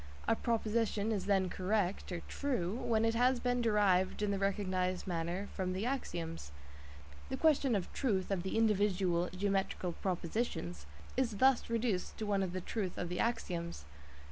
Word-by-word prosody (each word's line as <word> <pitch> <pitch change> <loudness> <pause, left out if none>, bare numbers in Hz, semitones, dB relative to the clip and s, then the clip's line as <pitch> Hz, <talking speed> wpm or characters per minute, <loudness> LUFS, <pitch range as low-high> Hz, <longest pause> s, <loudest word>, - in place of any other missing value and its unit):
A 225 - +4
proposition 225 -2 0
is 205 -3 -1
then 195 -2 +3
correct 190 +1 -1 0.2
("true") 225 -10 -1
when 225 -2 +1
it 225 - +2
has 250 +2 +3
been 245 0 +1
derived 205 -4 +3
in 205 - +1
the 200 - -1
recognised 185 -2 0
manner 175 +2 -2
from 185 -2 -1
the 190 +4 -2
axioms. 170 - -3 0.8
The 265 - -2
question 280 -5 +3
of 190 -3 -3
"truth" 200 -8 0
of 190 -3 +1
the 190 +4 -2
individual 195 -5 +2
geometrical 195 -1 -1
propositions 170 - -3 0.3
is 235 -5 0
thus 260 +1 +4
reduced 230 -5 -1
to 220 - -3
one 200 -1 +1
of 190 -2 -1
the 185 +1 -3
"truth" 190 -1 -3
of 175 - -3
the 180 - -3
axioms. 170 - -2
200 Hz, 160 wpm, -34 LUFS, 180-225 Hz, 0.8 s, A